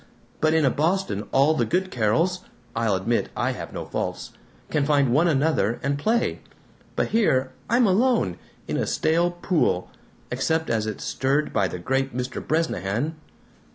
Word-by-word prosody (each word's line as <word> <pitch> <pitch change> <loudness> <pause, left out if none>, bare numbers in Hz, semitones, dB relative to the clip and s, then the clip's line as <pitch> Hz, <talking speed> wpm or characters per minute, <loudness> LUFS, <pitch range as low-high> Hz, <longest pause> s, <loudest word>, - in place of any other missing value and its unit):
But 155 0 +3
in 160 -2 +3
a 130 - +4
Boston 155 - 0
all 140 +4 +4
the - - +1
good 185 +2 0
Carols 125 - +1 0.4
(I'll 115 -3 +1
admit 105 +6 0
I - - +1
have - - -7
no - - -5
faults) - - -4 0.4
can 150 - +2
find 140 -4 +3
one 160 +6 +4
another 140 - +1
and 140 +1 0
play. 230 +8 +1 0.6
But - - 0
here 135 - +2 0.2
I'm 240 +2 +4
alone, 210 - +2 0.3
in - - -1
a - - -1
stale 165 +2 +2
pool 175 - 0 0.4
except 160 +6 0
as 110 -1 0
it's 110 - -5
stirred 140 +3 0
by 100 -3 +2
the 90 - -5
great 135 +7 -1
Mr. 125 +1 -3
Bresnahan!" 150 - -1
145 Hz, 160 wpm, -24 LUFS, 120-170 Hz, 0.6 s, a